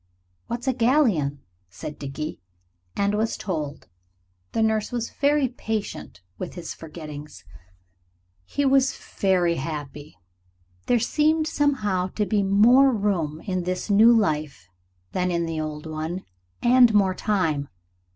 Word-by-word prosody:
"What's 240 +3 -4
a 260 - +3
galleon?" 225 - +2 0.3
said 85 - -8
Dickie. 145 +2 -5 0.5
And 200 0 +1
was 220 +2 0
told. 155 -6 -4 0.6
The 225 - +1
nurse 220 -1 0
was 240 -1 -3
very 290 -1 +2
patient 220 - -5 0.2
with 180 - -6
his 175 - -6
forgettings. 150 -2 -10 1.0
He 285 - -2
was 270 0 +3
very 180 -3 0
happy. 145 - -6 0.7
There 245 - +4
seemed 310 +6 +2
somehow 215 -13 0
to 210 - +1
be 210 -1 +1
more 230 +8 +5
room 180 -9 -1
in 185 -3 -2
this 185 +3 -3
new 220 +4 +7
life 155 - 0 0.4
than 180 0 0
in 170 -1 0
the 165 -1 -3
old 150 0 -5
one, 160 +4 -4 0.4
and 245 -1 +6
more 195 -2 +4
time. 160 -9 0
190 Hz, 130 wpm, -24 LUFS, 155-235 Hz, 1.0 s, new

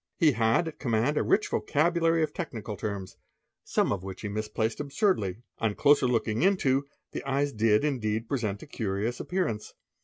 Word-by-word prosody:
He 160 -4 +5
had 115 +7 +2
at 160 - -7
command 120 +3 +1
a - - +2
rich 210 - +2
vocabulary 165 +1 +2
of 155 - -2
technical 110 - -5
terms, 100 -3 -5 0.5
some - - +1
of 100 - -4
which 95 -1 -7
he 105 - -4
misplaced 110 +2 -2
absurdly. 140 - 0 0.2
On 110 -3 0
closer 145 -3 +4
looking 115 -2 0
into, 145 -8 +2 0.2
the - - -4
eyes 140 +1 0
did 110 +2 +3
indeed 115 -6 -1
present 110 -7 -2
a - - -8
curious 110 +3 -2
appearance. 175 - -2
120 Hz, 165 wpm, -28 LUFS, 105-150 Hz, 0.5 s, He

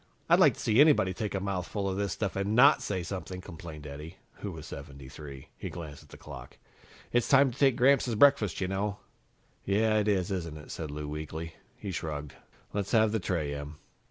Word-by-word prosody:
"I'd - - +6
like - - +6
to - - -13
see 115 +4 +4
anybody 145 -12 +5
take 105 -2 -3
a - - 0
mouthful 100 0 -2
of 95 - -1
this 100 0 -1
stuff 100 -3 -2
and 100 +2 0
not 140 +5 +7
say 95 -3 -2
something," 90 +1 -5
complained 80 -3 -9
Eddie, 75 +4 -8 0.2
who 100 - -5
was 80 -3 -9
73. 70 0 -9
He - - -6
glanced 80 -4 -8
at - - -19
the - - -12
clock. - - -10 0.5
"It's 120 -1 +2
time 135 -1 +6
to 120 - -12
take 135 -3 +5
Gramps 135 +2 +4
his 120 -3 -1
breakfast, 110 - +4
you 95 - +1
know." 100 +2 -2 0.7
"Yeah, 110 +2 +2
it 105 - 0
is, 95 -3 +1
isn't 85 -5 -3
it?" 75 - -11
said 80 -2 -5
Lou 75 0 -5
weakly. 80 +2 -5 0.2
He 100 - -5
shrugged. 75 -3 -4 0.4
"Let's 100 +1 -2
have 110 -2 +5
the 110 - 0
tray, 85 -6 -1
Em." 70 +1 -6
95 Hz, 210 wpm, -29 LUFS, 75-105 Hz, 0.7 s, not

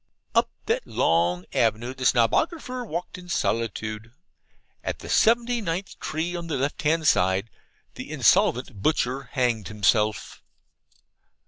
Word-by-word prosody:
Up - - +3 0.2
that - - -1
long 85 +2 +1
avenue 115 +2 +1
the 130 0 -6
Snobographer 250 - +1
walked 180 -3 -5
in 180 0 -13
solitude. 115 -5 -2 0.7
At - - -3
the - - -10
seventy 235 +1 +3
ninth 180 0 -4
tree 165 +3 -3
on 170 -1 -5
the 160 - -2
left 140 +3 -2
hand 155 +1 +1
side, 95 +1 +2 0.4
the - - -8
insolvent 120 -4 +2
butcher 130 -1 0
hanged 120 -7 0
himself. 105 +1 0
130 Hz, 125 wpm, -25 LUFS, 110-170 Hz, 0.7 s, Up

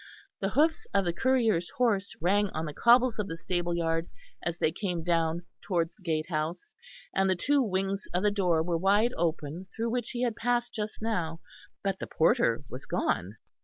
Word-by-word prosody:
The 195 - 0
hoofs 315 +7 +2
of 195 -1 +3
the 175 - 0
courier's 225 -7 +2
horse 205 -5 +1
rang 200 +4 +2
on 160 +1 -1
the 150 - -5
cobbles 240 - +4
of 205 - -1
the 165 - -5
stable 175 0 -1
yard 165 0 0 0.3
as 170 0 -2
they 155 - +2
came 175 -2 -3
down 165 0 +1 0.2
towards 170 -3 0
the 200 - -26
gatehouse, 160 - -2 0.4
and 195 0 +2
the 185 - +3
two 285 +10 +2
wings 195 -2 -1
of 180 +2 0
the 210 - +4
door 180 -5 +2
were 170 0 0
wide 205 +6 +3
open 165 +1 -2
through 230 +1 -1
which 240 -1 -1
he 245 0 -2
had 235 -3 0
passed 240 +1 0
just 215 0 -4
now; 170 -8 -1 0.4
but 195 -1 -1
the - - -5
porter 120 -6 +2
was 125 - -8
gone. 95 +5 -1
185 Hz, 190 wpm, -29 LUFS, 165-220 Hz, 0.4 s, cobbles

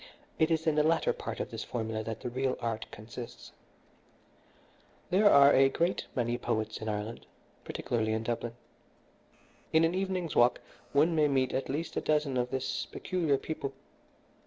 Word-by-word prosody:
It 160 - +4
is 160 -1 +1
in 160 - +3
the 150 - +3
latter 160 +2 +2
part - - -6
of - - -4
this - - -4
formula 110 -2 -3
that 115 -1 -5
the - - -3
real 130 +1 -1
art 115 -2 -3
consists. 115 +3 -9 1.6
"There 205 +3 +6
are 140 -3 +7
a 135 0 +6
great 170 +6 0
many 120 -1 0
poets 110 -3 -2
in 110 - -3
Ireland, 105 +2 -4 0.4
particularly 110 -2 -1
in 110 0 -1
Dublin. 120 0 -3 1.2
In 160 +1 +5
an 165 +1 +3
evening's 185 -3 -2
walk 120 +1 +5 0.3
one 155 +4 +4
may 155 -1 +4
meet 130 -2 +1
at 135 - -2
least 150 +5 -3
a - - +1
dozen 150 -3 +1
of 125 0 0
this 130 0 -2
peculiar 165 -7 0
people. 140 -1 -4
135 Hz, 165 wpm, -30 LUFS, 115-160 Hz, 1.6 s, are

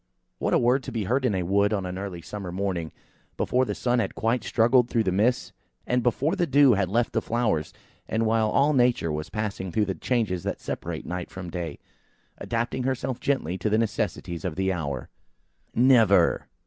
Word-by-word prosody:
What - - +1
a - - +6
word 125 +3 +3
to - - -5
be 115 -3 -2
heard 130 +7 0
in 110 -6 +1
a 90 - 0
wood 100 +3 +2
on 100 -3 -1
an 90 +1 -5
early 95 -4 -6
summer 100 -1 -6
morning, 90 -4 -2 0.5
before 130 +1 +1
the - - -3
sun 125 -1 +1
had - - -2
quite 115 +3 0
struggled 120 +1 +3
through 115 -2 +1
the 95 - 0
mists, 110 +7 +1 0.3
and 125 0 +1
before 130 - +1
the 175 - 0
dew 140 -1 +6
had 100 -3 0
left 115 +4 0
the - - +1
flowers 110 -10 -1 0.4
and 115 +1 0
while 110 -1 +2
all 140 +6 +3
Nature 120 - +2
was 75 +1 -4
passing 105 -4 -3
through 105 +4 +1
the 95 - -2
changes 100 -1 -1
that - - -3
separate - - -5
night 90 0 -4
from 90 -2 -8
day, 85 -4 -4 0.6
adapting 120 +2 -2
herself 130 -1 -2
gently 95 - -1
to 105 - 0
the 110 - +2
necessities 105 -6 -2
of 90 -5 -3
the 95 0 0
hour. 70 -7 -4 0.7
"Never!" 115 -8 +4
110 Hz, 200 wpm, -26 LUFS, 90-125 Hz, 0.7 s, a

